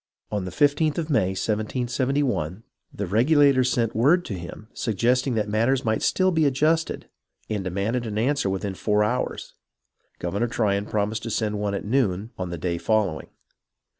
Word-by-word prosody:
On 105 -3 -2
the 90 - -5
15th 145 +1 +2
of 160 -2 -2
May, 95 -8 +2
1771, 120 - -1 0.3
the 100 - -4
Regulators 130 - +4
sent 115 -2 0
word 150 +11 +4
to - - -4
him 90 +4 -8
suggesting 125 +4 +1
that 105 -1 0
matters 115 +5 +1
might 110 0 +1
still 185 0 +2
be 160 -3 +3
adjusted, 155 +4 0 0.4
and 105 -2 -1
demanded 100 +6 -2
an 105 -1 -4
answer 130 -1 +1
within 95 +1 -2
four 105 +2 +1
hours. 120 +4 -2 0.6
Governor 100 +7 -1
Tryon 105 -3 0
promised 105 +1 -1
to 115 - -5
send 105 -2 -1
one 100 -1 -1
at 100 - -4
noon 110 -3 0
on 90 -2 -4
the 85 - -4
day 85 +1 -2
following. 105 -8 0
110 Hz, 165 wpm, -24 LUFS, 100-130 Hz, 0.6 s, Regulators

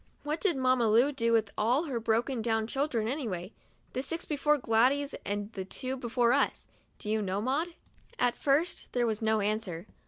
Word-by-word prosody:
What 300 +2 -2
did 360 -9 +2
Mamma 255 -2 +3
Lu 240 +7 +5
do 230 -5 0
with 220 -3 +2
all 245 +8 +2
her 270 -8 -2
broken 230 +2 0
down 225 -1 +1
children, 245 -2 -1
anyway 220 - -3 0.2
— - - -37
the 255 - -1
six 325 +5 -4
before 300 0 +2
Gladys 260 +4 +2
and 205 +2 -3
the 190 - -4
two 255 +7 -3
before 245 -1 +1
us? 280 - +1 0.3
Do - - -8
you 215 +1 +1
know, 195 -1 -1
Maud?" 295 +9 -1 0.4
At 245 -1 +2
first 295 +5 +1
there 245 -1 +2
was 220 -1 -1
no 220 -1 +2
answer. 200 -4 -2
240 Hz, 190 wpm, -30 LUFS, 220-275 Hz, 0.4 s, Lu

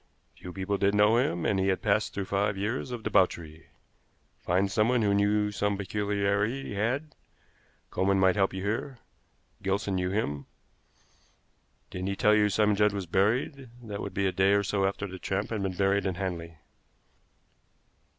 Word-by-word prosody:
"Few 90 - -9
people 95 +2 -2
did 100 +1 +2
know 105 +2 +5
him, 85 -9 0
and 95 - +1
he 95 - +1
had 95 -1 0
passed 105 0 +1
through 100 - -4
five 100 +1 0
years 110 +7 -2
of 120 -3 -6
debauchery. 85 -6 0 0.7
Find 95 +3 0
someone 115 +3 +2
who 100 -1 +2
knew 105 +1 +2
of 105 - -9
some 100 0 0
peculiarity 100 +4 -1
he - - -5
had. 130 +10 -2 0.8
Coleman 95 +1 +1
might 95 0 +4
help 95 -2 +2
you 95 0 -5
here. 115 +6 -3 0.6
Gilson 100 +1 -1
knew 90 -1 0
him. 75 -8 -2 1.4
Didn't 90 +1 -4
he 100 - -1
tell 105 +2 +4
you 105 -1 +4
Simon 105 +1 +2
Judd 105 0 +3
was 100 -2 -3
buried? 115 - 0
That 105 -2 -6
would 95 - -6
be 100 - +1
a 95 - +2
day 95 +2 +3
or 100 0 +3
so 100 0 0
after 100 +1 -3
the 95 -1 -8
tramp 100 +4 -2
had 110 -3 -2
been 95 -1 -2
buried 100 +1 +1
in 95 - -2
Hanley." 85 -3 -5
100 Hz, 180 wpm, -28 LUFS, 95-105 Hz, 1.4 s, know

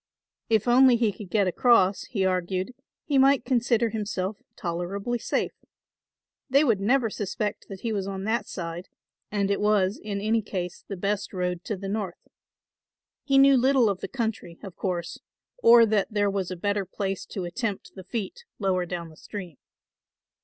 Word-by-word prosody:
If 220 0 +2
only 250 +1 +6
he 230 -3 +2
could 200 -1 -10
get 205 0 +2
across, 195 0 +3
he 195 -6 -1
argued, 185 +4 -1 0.3
he 285 -3 +2
might 270 -1 +4
consider 235 -2 +2
himself 205 -2 -3 0.2
tolerably 195 +7 -3
safe. - - -1 1.0
They 275 +3 +5
would 230 -9 +2
never 230 +2 +2
suspect 210 +1 -3
that 195 -2 -8
he 230 -2 -2
was 195 -2 -2
on 195 -1 -4
that 220 +3 -1
side 170 0 -6 0.4
and 200 -1 0
it 200 - 0
was 205 -2 +2
in 205 -2 -3
any 220 +2 +1
case 180 -4 -5
the 200 - -5
best 200 +2 -2
road 180 -1 -2
to 210 - -3
the 195 +1 -6
North. 195 -3 -4 1.0
He 275 -1 +2
knew 275 0 +7
little 255 -3 +4
of 190 - -5
the - - -5
country, 220 -9 -4
of 190 -4 -8
course, 175 -3 -3 0.4
or 235 - +8
that 215 -2 +1
there 205 -1 +1
was 195 -3 -2
a 185 - -4
better 205 +3 -1
place 195 +1 -3
to 190 -3 -5
attempt 200 +3 -4
the 190 - -10
feat 220 - -5
lower 185 -3 0
down 170 -1 -5
the 155 - -15
stream. 180 -8 -8
205 Hz, 175 wpm, -26 LUFS, 185-230 Hz, 1.0 s, or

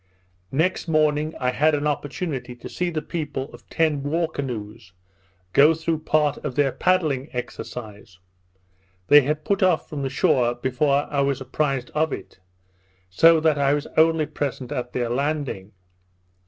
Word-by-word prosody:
Next 165 +7 0
morning 155 -1 +1
I 125 -1 +1
had 150 +4 +2
an 145 0 -2
opportunity 145 -3 -3
to 120 - -10
see 180 0 -2
the 160 -2 -3
people 145 -5 -4
of - - -15
ten 155 -3 +1
war 160 +4 0
canoes 115 - -6 0.6
go 150 +3 +6
through 160 0 -2
part 155 -2 +1
of 135 -4 -5
their 140 -1 +2
paddling 155 -7 0
exercise. 115 -6 -7 0.9
They 145 0 +9
had 150 +3 -2
put 200 - 0
off 185 -4 +2
from 145 -2 -5
the 135 - -2
shore 130 -5 +2
before 140 +3 +1
I 140 -1 +1
was 140 -1 0
apprised 130 -1 -2
of 155 0 0
it; - - -8 0.7
so 165 - +6
that 155 -2 +2
I 140 0 +3
was 145 - -3
only 160 0 +4
present 140 -4 -4
at 125 0 -3
their 120 -1 -1
landing. 135 -6 -2
145 Hz, 155 wpm, -23 LUFS, 130-155 Hz, 0.9 s, They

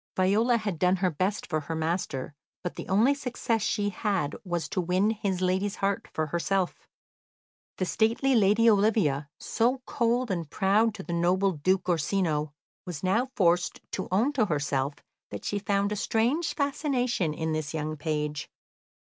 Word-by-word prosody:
Viola 215 +6 +3
had 205 -7 -3
done 180 +2 +4
her 185 -1 +1
best 185 +7 -1
for 155 - -1
her 155 +2 -5
master, 160 -4 -2 0.3
but 180 - -3
the - - -8
only 220 +9 +4
success 245 -4 -2
she 205 0 0
had 190 -6 -1
was 175 -3 -2
to 185 - -1
win 185 +5 +2
his 195 -4 -2
lady's 190 +2 0
heart 200 0 -1
for 155 - -1
herself. 175 +4 -1 0.9
The 185 - 0
stately 230 +7 +2
lady 220 0 +4
Olivia, 200 -10 +3
so 250 +3 0
cold 240 0 0
and 170 -5 -3
proud 210 +6 +2
to 195 - -7
the 175 - -5
noble 180 +3 +2
Duke 185 +4 0
Orsino, 160 -3 0 0.3
was 175 -4 -7
now 225 +8 +1
forced 175 -5 +2
to 190 - -3
own 230 +10 +2
to 230 -7 +2
herself 145 -3 -1 0.3
that - - -7
she 205 - -1
found 200 0 0
a - - 0
strange 240 +10 0
fascination 255 - 0
in 160 0 -2
this 155 -2 -2
young 155 -1 -3
page. 150 -1 -3
190 Hz, 165 wpm, -28 LUFS, 165-220 Hz, 0.9 s, done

